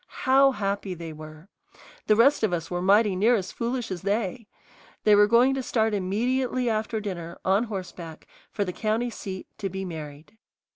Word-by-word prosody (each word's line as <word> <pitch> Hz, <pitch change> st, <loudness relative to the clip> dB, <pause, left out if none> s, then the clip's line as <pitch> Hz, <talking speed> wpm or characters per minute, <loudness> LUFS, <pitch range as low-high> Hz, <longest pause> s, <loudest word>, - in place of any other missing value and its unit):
How 270 Hz, +1 st, +6 dB
happy 200 Hz, -3 st, -3 dB
they 165 Hz, -1 st, -7 dB
were! 155 Hz, +2 st, -12 dB, 0.6 s
The 215 Hz, -, +5 dB
rest 260 Hz, +6 st, +4 dB
of 215 Hz, -5 st, +1 dB
us 165 Hz, 0 st, -3 dB
were 175 Hz, 0 st, -2 dB
mighty 200 Hz, +1 st, +4 dB
near 220 Hz, +6 st, +4 dB
as 190 Hz, -4 st, -3 dB
foolish 240 Hz, -2 st, -3 dB
as 180 Hz, -2 st, -4 dB
they. 210 Hz, +2 st, -2 dB, 0.6 s
They 210 Hz, -, +5 dB
were 205 Hz, 0 st, +6 dB
going 240 Hz, +4 st, +4 dB
to 270 Hz, -, -2 dB
start 225 Hz, -3 st, 0 dB
immediately 245 Hz, +6 st, 0 dB
after 220 Hz, 0 st, -1 dB
dinner, 175 Hz, -5 st, -6 dB
on 195 Hz, +5 st, +3 dB
horseback, 180 Hz, -6 st, -7 dB, 0.2 s
for 205 Hz, -, -2 dB
the 180 Hz, -, -4 dB
county 225 Hz, +4 st, -1 dB
seat, 190 Hz, -3 st, -7 dB
to 195 Hz, -, -2 dB
be 190 Hz, +1 st, -5 dB
married. 155 Hz, 0 st, -9 dB
205 Hz, 180 wpm, -26 LUFS, 180-230 Hz, 0.6 s, How